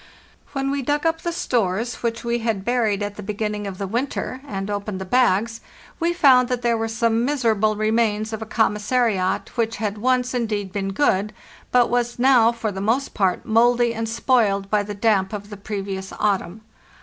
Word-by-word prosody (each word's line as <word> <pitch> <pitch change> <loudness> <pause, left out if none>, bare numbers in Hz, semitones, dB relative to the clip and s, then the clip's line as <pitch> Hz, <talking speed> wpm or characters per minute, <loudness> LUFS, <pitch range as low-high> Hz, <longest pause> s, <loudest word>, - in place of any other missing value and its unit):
When 275 -1 -1
we 280 0 -1
dug 290 +4 -1
up 325 0 +1
the 345 - -2
stores 230 - -1
which 235 -1 -2
we 235 0 0
had 220 -4 -2
buried 225 -5 +1
at 205 0 -5
the - - -6
beginning 210 0 -3
of 190 -2 -6
the 200 - -3
winter, 255 +4 -3
and 195 -5 -4
opened 205 -1 -4
the 190 - -5
bags, 225 0 +2 0.4
we 340 +1 +1
found 265 -7 +5
that 250 -1 -2
there 235 -1 +2
were 225 0 -1
some 225 +1 +1
miserable 225 -6 +1
remains 215 0 0
of 220 - -4
a 220 - -5
commissariat 210 -3 0
which 230 -1 0
had 210 -1 -3
once, 255 +2 +1
indeed, 215 -5 -2
been 195 0 -2
good, 210 -2 +1 0.4
but 245 -2 +3
was 240 0 0
now 245 -2 +5
for 230 -2 -3
the 190 -1 -5
most 235 +7 0
part 190 -3 0
mouldy 235 +1 +3
and 225 -1 -3
spoiled 220 -4 +1
by 210 -1 +3
the 205 0 -6
damp 200 -2 +1
of 205 0 -6
the - - -6
previous 195 -1 -5
autumn. 200 -1 -1
225 Hz, 190 wpm, -22 LUFS, 205-245 Hz, 0.4 s, found